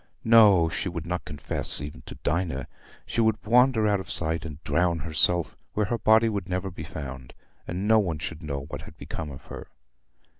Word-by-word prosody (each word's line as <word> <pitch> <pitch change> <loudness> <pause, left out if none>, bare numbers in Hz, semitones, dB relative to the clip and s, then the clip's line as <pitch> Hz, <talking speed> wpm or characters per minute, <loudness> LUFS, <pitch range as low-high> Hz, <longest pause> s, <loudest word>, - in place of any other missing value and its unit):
No; 105 -7 +6
she 85 +3 -3
would 85 -3 -6
not 90 +1 -3
confess 75 -2 +2
even 75 +3 -7
to - - -8
Dinah. 80 -4 -1 0.4
She 115 - -1
would 110 -1 +2
wander 120 -1 +4
out 100 -1 +2
of 95 - -9
sight, 80 0 0
and 75 -3 -7
drown 90 -1 +1
herself 80 +2 +1 0.2
where 105 - +1
her 115 +3 -2
body 110 +1 +5
would 100 -4 -3
never 95 +1 -2
be - - -8
found, 65 -3 -8 0.3
and 95 +4 -3
no 110 0 +6
one 85 -7 -1
should 80 0 -6
know 70 -2 -4
what 70 - -7
had - - -13
become 80 -2 -6
of 65 -2 -11
her. - - -9
85 Hz, 195 wpm, -26 LUFS, 80-105 Hz, 0.4 s, No